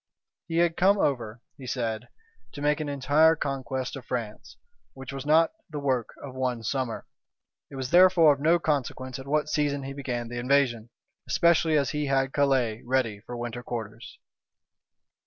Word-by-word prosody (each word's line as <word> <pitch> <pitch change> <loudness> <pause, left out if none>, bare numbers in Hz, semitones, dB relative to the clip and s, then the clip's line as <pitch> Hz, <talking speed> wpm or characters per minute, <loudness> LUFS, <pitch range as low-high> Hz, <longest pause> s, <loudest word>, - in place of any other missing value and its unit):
"He 165 -1 -2
had 170 -1 +2
come 195 +3 +4
over," 120 - -1 0.2
he 130 - -9
said, 115 -2 -3 0.4
"to 145 - -8
make 150 0 +2
an 150 -1 -3
entire 145 +4 +4
conquest 130 -3 -3
of 135 - -8
France, 115 -4 -6 0.4
which 135 0 -9
was 135 +1 -6
not 160 +2 +4 0.2
the 150 - -6
work 130 -5 -1
of 135 -2 -8
one 125 -3 -2
summer. 130 0 -3 0.6
It - - -11
was 130 -1 -4
therefore 175 -3 +6
of 140 - -8
no 165 +4 +4
consequence 130 -5 -2
at 135 - -10
what 150 +1 +1
season 145 -2 0
he 135 +1 -6
began 125 -4 -4
the 120 +1 -5
invasion; 125 -3 +1 0.4
especially 165 -2 +3
as 140 -4 +1
he 150 -1 -2
had 135 -1 +1
Calais 130 -6 +1
ready 120 -5 0
for 120 +4 -8
winter 120 0 -5
quarters." 115 -2 -7
135 Hz, 170 wpm, -27 LUFS, 120-150 Hz, 0.6 s, therefore